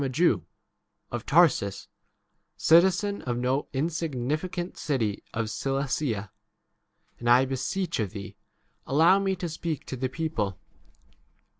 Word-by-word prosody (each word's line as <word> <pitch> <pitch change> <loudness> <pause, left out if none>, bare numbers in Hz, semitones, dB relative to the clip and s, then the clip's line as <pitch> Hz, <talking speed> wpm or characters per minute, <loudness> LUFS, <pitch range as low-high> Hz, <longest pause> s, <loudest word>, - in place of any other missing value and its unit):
a 135 - -1
Jewi 165 +7 +3 0.7
of 120 -1 -5
Tarsus, 130 - +3 0.7
citizen 190 +5 +4
of 120 -2 -2
no 130 +3 0
insignificant 160 +4 -2
city 115 -9 -1
of 115 -1 -2
Cilicia, 135 -6 -1 0.9
and 120 - -1
I 125 +2 +6
beseech 160 +7 -2
of 105 -3 0
thee, 100 -1 -8 0.5
allow 165 +7 +5
me 195 -1 0
to 180 -1 -4
speak 160 -2 -3
40 - - -26
to - - -5
the 130 +1 -1
people. 120 - -2
135 Hz, 125 wpm, -27 LUFS, 120-170 Hz, 0.9 s, I